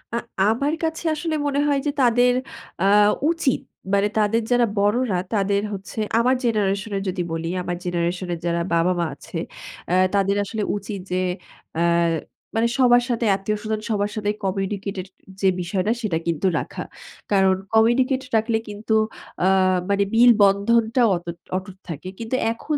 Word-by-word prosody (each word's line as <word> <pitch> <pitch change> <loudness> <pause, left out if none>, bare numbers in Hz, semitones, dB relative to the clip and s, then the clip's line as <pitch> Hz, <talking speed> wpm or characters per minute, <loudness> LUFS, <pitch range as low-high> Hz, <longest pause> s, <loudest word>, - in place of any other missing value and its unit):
আ - - +1 0.3
আমার 240 +9 +1
কাছে 320 +1 -2
আসলে 315 +1 -2
মনে 285 0 0
হয় 285 -1 +2
যে - - +2
তাদের 245 0 +4 0.5
আ - - +3 0.5
উচিত। 330 -6 0 0.3
মানে 200 +1 +3
তাদের 215 +2 +2
যারা 245 -1 +4
বড়রা 205 +2 +2 0.2
তাদের 200 -1 +1
হচ্ছে 195 +2 -7 0.2
আমার 250 +3 +3
জেনারেশন 210 -2 0
এর - - -2
যদি 185 0 -2
বলি, 165 0 -3
আমার 175 0 -3
জেনারেশন 175 +1 -1
এর 170 - -5
যারা 170 0 0
বাবা 170 +2 +3
মা 170 - +1
আছে 150 - -8 0.5
অ্যা 180 - +2 0.2
তাদের 200 0 +2
আসলে 210 +1 -3
উচিত 200 0 -5
যে 180 - +1 0.6
আ - - +1 0.7
মানে 225 +1 +3
সবার 245 -2 +5
সাথে 235 -1 0
আত্মীয়স্বজন 215 +2 -3
সবার 205 -1 0
সাথে 210 -1 -1
কমিউনিকেটের 195 0 -3 0.3
যে 195 - +3
বিষয়টা 185 +4 -1
সেটা 200 -8 0
কিন্তু 170 +3 0
রাখা। - - -6 0.5
কারণ 190 -1 +4 0.2
কমিউনিকেট 250 +4 +3
রাখলে 225 +1 +2
কিন্তু 210 +2 -3 0.5
আ - - +4 0.4
মানে 200 0 +3
মিল 240 +2 +7
বন্ধনটাও 225 +4 +3
অতুট 170 0 -7 0.2
অটুট 190 0 -8
থাকে। 165 +3 -6
কিন্তু 230 +2 -2 0.2
এখন 295 +6 -3
205 Hz, 155 wpm, -22 LUFS, 190-235 Hz, 0.7 s, মিল